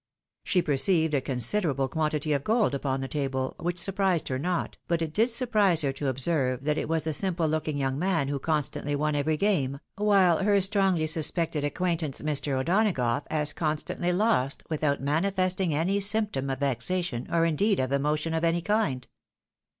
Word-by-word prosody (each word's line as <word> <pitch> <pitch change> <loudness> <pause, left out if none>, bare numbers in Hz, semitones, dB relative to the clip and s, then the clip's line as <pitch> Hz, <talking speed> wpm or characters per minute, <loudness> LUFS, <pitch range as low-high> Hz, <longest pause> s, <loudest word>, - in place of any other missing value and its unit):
She 180 -2 +1
perceived 160 +2 +2
a 140 - +2
considerable 135 - 0
quantity 150 +1 -1
of 140 -1 -1
gold 220 -4 +2
upon 135 -1 -2
the 135 - -3
table, 135 -2 -2
which 175 +1 -2
surprised 190 -2 0
her 130 -1 -2
not, 175 +3 -2
but 170 -1 0
it 155 -1 -5
did 225 +6 +2
surprise 215 - +2
her 135 -1 0
to 140 +1 -4
observe 130 -1 0
that 150 +1 0
it - - -4
was 160 -1 0
the 160 0 -2
simple 170 0 0
looking 155 -1 -1
young 135 0 -1
man 170 -5 +1
who 140 0 -2
constantly 145 -1 -2
won 150 +1 0
every 150 +2 0
game, 145 -9 0 0.2
while 195 -5 +4
her 200 0 +3
strongly 190 -4 +2
suspected 155 -1 0
acquaintance, 160 -1 -1
Mr. 145 -3 0
O'Donagough 145 - +1
as 150 -1 +1
constantly 160 +3 -2
lost 180 - +1
without 150 -3 0
manifesting 185 +4 0
any 170 +7 +1
symptom 200 -9 +1
of 135 +1 -3
vexation, 140 +1 -1
or 165 -1 +3
indeed 195 +6 +1
of 130 0 -1
emotion 150 +3 0
of 160 0 -1
any 170 0 +1
kind. 190 - 0
155 Hz, 175 wpm, -27 LUFS, 140-185 Hz, 0.2 s, while